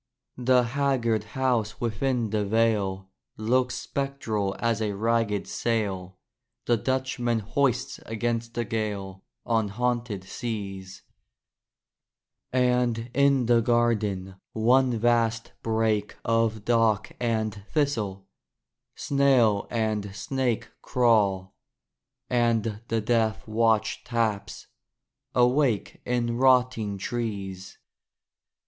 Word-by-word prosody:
The 125 Hz, 0 st, +4 dB
haggard 120 Hz, -4 st, 0 dB
house 120 Hz, -5 st, 0 dB
within 120 Hz, -1 st, -1 dB
the 105 Hz, -1 st, +1 dB
vale 100 Hz, -3 st, 0 dB, 0.3 s
Looks 125 Hz, +3 st, +1 dB
spectral 125 Hz, -7 st, -2 dB
as 115 Hz, -2 st, 0 dB
a 105 Hz, -2 st, -1 dB
ragged 110 Hz, -1 st, 0 dB
sail 95 Hz, -5 st, -2 dB, 0.5 s
The 120 Hz, -, +3 dB
Dutchman 130 Hz, 0 st, -1 dB
hoists 125 Hz, +3 st, 0 dB
against 115 Hz, +1 st, -2 dB
the 120 Hz, -, -1 dB
gale 100 Hz, -4 st, -4 dB, 0.2 s
On 115 Hz, -2 st, +1 dB
haunted 120 Hz, -2 st, -2 dB
seas: 100 Hz, -3 st, -6 dB, 1.5 s
And 125 Hz, -2 st, +1 dB
in 140 Hz, -2 st, +3 dB
the 120 Hz, 0 st, +4 dB
garden, 105 Hz, -5 st, 0 dB, 0.2 s
one 125 Hz, +2 st, +3 dB
vast 115 Hz, 0 st, +1 dB
brake 110 Hz, -2 st, 0 dB
Of 115 Hz, -2 st, +1 dB
dock 115 Hz, -3 st, +2 dB
and 110 Hz, -3 st, -1 dB
thistle, 110 Hz, -11 st, -1 dB, 0.7 s
snail 130 Hz, -7 st, +3 dB
and 110 Hz, -3 st, -2 dB
snake 120 Hz, +3 st, -2 dB
Crawl; 100 Hz, -6 st, +2 dB, 0.7 s
and 115 Hz, -3 st, +1 dB
the 115 Hz, 0 st, 0 dB
death 110 Hz, -1 st, 0 dB
watch 110 Hz, 0 st, +1 dB
taps, 115 Hz, -4 st, -2 dB, 0.7 s
awake 125 Hz, -2 st, +2 dB
In 120 Hz, -1 st, 0 dB
rotting 125 Hz, -5 st, +3 dB
trees. 100 Hz, -4 st, -4 dB
115 Hz, 95 wpm, -26 LUFS, 105-120 Hz, 1.5 s, The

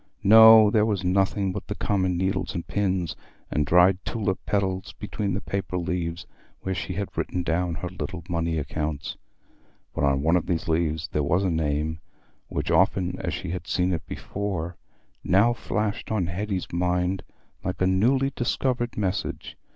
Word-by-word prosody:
No, 110 Hz, 0 st, +9 dB
there 105 Hz, -1 st, +4 dB
was 105 Hz, -4 st, 0 dB
nothing 95 Hz, +1 st, +1 dB
but 105 Hz, +2 st, -6 dB
common 95 Hz, -3 st, 0 dB
needles 95 Hz, +2 st, -1 dB
and 85 Hz, -, -3 dB
pins, 95 Hz, -5 st, -1 dB, 0.4 s
and 75 Hz, 0 st, 0 dB
dried 90 Hz, +3 st, +5 dB
tulip 105 Hz, -5 st, -2 dB
petals 95 Hz, -2 st, -1 dB
between 100 Hz, -3 st, -3 dB
the 100 Hz, -, -3 dB
paper 95 Hz, -2 st, -3 dB
leaves 85 Hz, -1 st, -3 dB, 0.4 s
where 95 Hz, -, -2 dB
she 95 Hz, -, -4 dB
had 100 Hz, +2 st, -4 dB
written 90 Hz, -, -2 dB
down 85 Hz, 0 st, 0 dB
her 80 Hz, +3 st, -4 dB
little 90 Hz, -1 st, -6 dB
money 85 Hz, -2 st, -1 dB
accounts. 75 Hz, 0 st, -3 dB, 0.8 s
But -, -, -2 dB
on 70 Hz, 0 st, +2 dB
one 80 Hz, +3 st, +4 dB
of 85 Hz, -, -3 dB
these 90 Hz, +2 st, -1 dB
leaves 80 Hz, -1 st, 0 dB
there 75 Hz, -, 0 dB
was 90 Hz, +7 st, +1 dB
a 95 Hz, -, +1 dB
name, 80 Hz, 0 st, -1 dB, 0.5 s
which, -, -, -2 dB
often 90 Hz, -1 st, +2 dB
as -, -, -2 dB
she -, -, -5 dB
had 90 Hz, -, -5 dB
seen 90 Hz, 0 st, +1 dB
it 80 Hz, -, -4 dB
before, 95 Hz, -4 st, -4 dB, 0.5 s
now 100 Hz, +7 st, +4 dB
flashed 105 Hz, -2 st, -3 dB
on 105 Hz, -5 st, +1 dB
Hetty's 95 Hz, +1 st, -3 dB
mind 90 Hz, +1 st, 0 dB, 0.4 s
like 90 Hz, 0 st, -3 dB
a 95 Hz, -, +2 dB
newly 125 Hz, +9 st, +2 dB
discovered 120 Hz, 0 st, -1 dB
message. 95 Hz, -3 st, -2 dB
90 Hz, 165 wpm, -25 LUFS, 85-100 Hz, 0.8 s, No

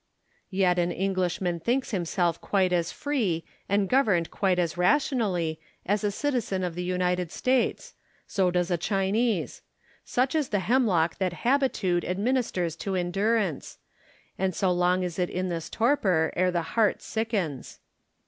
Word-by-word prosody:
Yet 185 Hz, -2 st, +2 dB
an 175 Hz, 0 st, +1 dB
Englishman 185 Hz, -2 st, -1 dB
thinks 250 Hz, +10 st, -1 dB
himself 175 Hz, -3 st, 0 dB
quite 185 Hz, -3 st, +1 dB
as 175 Hz, -1 st, +1 dB
free, 215 Hz, -, -1 dB, 0.3 s
and 200 Hz, 0 st, +2 dB
governed 205 Hz, -9 st, +2 dB
quite 190 Hz, -3 st, +1 dB
as 170 Hz, -3 st, 0 dB
rationally, 180 Hz, -, +1 dB, 0.3 s
as 205 Hz, +2 st, 0 dB
a 205 Hz, -, +2 dB
citizen 225 Hz, -5 st, -1 dB
of 180 Hz, -2 st, -2 dB
the 180 Hz, -, -4 dB
United 180 Hz, -1 st, -1 dB
States: 255 Hz, 0 st, 0 dB, 0.3 s
so 190 Hz, -2 st, +1 dB
does 180 Hz, 0 st, 0 dB
a 175 Hz, -, +1 dB
Chinese. 195 Hz, +1 st, 0 dB, 0.4 s
Such 255 Hz, +2 st, 0 dB
is 310 Hz, -4 st, 0 dB
the 205 Hz, -2 st, 0 dB
hemlock 195 Hz, -9 st, +2 dB
that 185 Hz, -2 st, 0 dB
habitude 235 Hz, -10 st, +2 dB
administers 190 Hz, -4 st, -1 dB
to 195 Hz, +1 st, -3 dB
endurance; 195 Hz, -1 st, -1 dB, 0.6 s
and 190 Hz, -2 st, 0 dB
so 190 Hz, -2 st, +1 dB
long 180 Hz, +1 st, +2 dB
is 180 Hz, 0 st, -4 dB
it 180 Hz, -, +1 dB
in 185 Hz, +1 st, -2 dB
this 165 Hz, -2 st, -4 dB
torpor 200 Hz, -, +2 dB
ere 185 Hz, +1 st, +2 dB
the 175 Hz, -2 st, -1 dB
heart 220 Hz, -3 st, +2 dB
sickens. 210 Hz, -, -3 dB
185 Hz, 150 wpm, -27 LUFS, 175-220 Hz, 0.6 s, Yet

